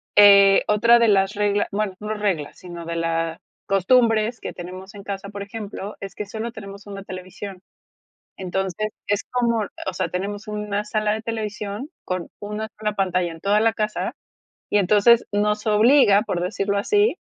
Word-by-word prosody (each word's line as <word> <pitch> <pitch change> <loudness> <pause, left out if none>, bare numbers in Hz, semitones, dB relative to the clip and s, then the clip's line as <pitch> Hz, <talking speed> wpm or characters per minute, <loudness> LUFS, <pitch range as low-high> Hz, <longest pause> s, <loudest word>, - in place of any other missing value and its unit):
eh, 200 -1 +8
otra 230 +3 +5
de 235 - +4
las 195 -1 +3
regla 205 0 +1
bueno, 200 -1 -1
no 210 +1 -3
reglas, 195 -9 -2
sino 175 -2 -9
de 170 - -4
la 165 0 -1 0.3
costumbres 225 +3 +3
que - - -5
tenemos 185 +2 -9
en 200 - -9
casa, 200 0 -5
por 200 -1 -6
ejemplo, 205 -1 -7
es 195 -1 -7
que 210 - -4
solo 220 +3 -5
tenemos 200 -2 -10
1 195 -1 -7
televisión. 185 0 -8 0.8
Entonces, 190 +3 -2 0.2
es 205 0 0
como 235 -3 +1 0.2
o 185 - -6
sea, - - -2
tenemos 200 +3 -4
una 210 -1 -2
sala 215 0 0
de 220 - -3
televisión 215 +2 -4 0.2
con 185 -2 -3
una 210 +1 -4
sola 210 -1 -1
pantalla 185 -3 0
en 165 0 -11
toda 205 +2 +3
la 225 +1 +3
casa, 215 -1 -2 0.6
y 205 - +3
entonces 210 +4 +5
nos 210 +1 0
obliga, 215 -1 +5
por 180 -6 -2
decirlo 200 +2 -1
así, 415 - +2
205 Hz, 170 wpm, -23 LUFS, 195-215 Hz, 0.8 s, eh